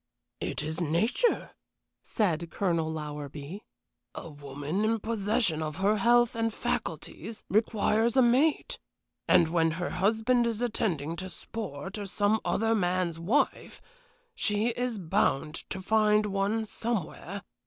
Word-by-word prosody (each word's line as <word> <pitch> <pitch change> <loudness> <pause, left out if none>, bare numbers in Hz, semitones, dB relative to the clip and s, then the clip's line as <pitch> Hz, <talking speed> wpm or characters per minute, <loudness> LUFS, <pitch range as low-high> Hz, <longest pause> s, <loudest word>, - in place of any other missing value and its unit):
"It - - -2
is 160 +3 -2
nature," 175 - +1 0.5
said 170 -6 -1
Colonel 170 -4 0
Lowerby. 150 +3 -6 0.5
"A 165 - -7
woman 145 +6 -4
in 225 +1 +2
possession 210 -5 0
of 155 -1 -3
her 200 +4 +2
health 240 +3 +4
and 225 0 0
faculties 220 0 -4
requires 220 +2 +2
a 260 - +7
mate, 265 +6 +2 0.5
and 165 - +5
when 165 -1 +3
her 180 - -2
husband 225 +5 +2
is 225 -2 -2
attending 175 -10 -1
to 185 +2 -5
sport 190 -1 -6
or 200 - -5
some 205 +2 +1
other 225 +1 +1
man's 180 -4 0
wife, 210 +13 0 0.5
she 215 - +1
is 240 -1 -2
bound 160 -5 +1 0.2
to 190 - -4
find 210 +1 +3
one 205 +2 0
somewhere. 200 -3 -4
200 Hz, 130 wpm, -29 LUFS, 165-225 Hz, 0.5 s, a